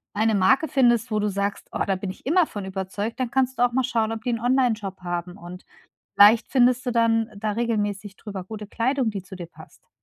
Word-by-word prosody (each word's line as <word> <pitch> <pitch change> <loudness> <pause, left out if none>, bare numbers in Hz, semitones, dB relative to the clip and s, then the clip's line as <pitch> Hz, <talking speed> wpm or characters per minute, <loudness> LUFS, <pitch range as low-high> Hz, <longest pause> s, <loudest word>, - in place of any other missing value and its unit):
eine 220 +1 +2
Marke 215 +11 +3
findest, 240 -5 +2
wo 215 - +1
du 210 0 0
sagst: 200 +1 -3
„Oh, - - -1
da 195 - 0
bin 190 +1 -5
ich 185 - -10
immer 330 +4 +3
von 205 -2 -7
überzeugt.“, 190 +4 -4
dann 255 -2 -1
kannst 260 +1 0
du - - +4
auch 245 -1 +2
mal 260 - +1
schauen, 225 -3 0
ob 220 -1 -5
die 245 - -1
'n 230 - -2
Online-Shop 230 -7 0
haben 175 +1 -4
und 180 0 -11 0.5
vielleicht 215 +2 +6
findest 250 -1 +3
du 250 - -1
dann 225 -1 +2
da 215 +1 -2
regelmäßig 205 -3 -2
drüber 200 -4 -7
gute 210 +2 -8
Kleidung, 250 +4 0
die 200 -4 -4
zu 190 - -11
dir 180 -2 -7
passt. 165 - -17
220 Hz, 230 wpm, -24 LUFS, 200-245 Hz, 0.5 s, vielleicht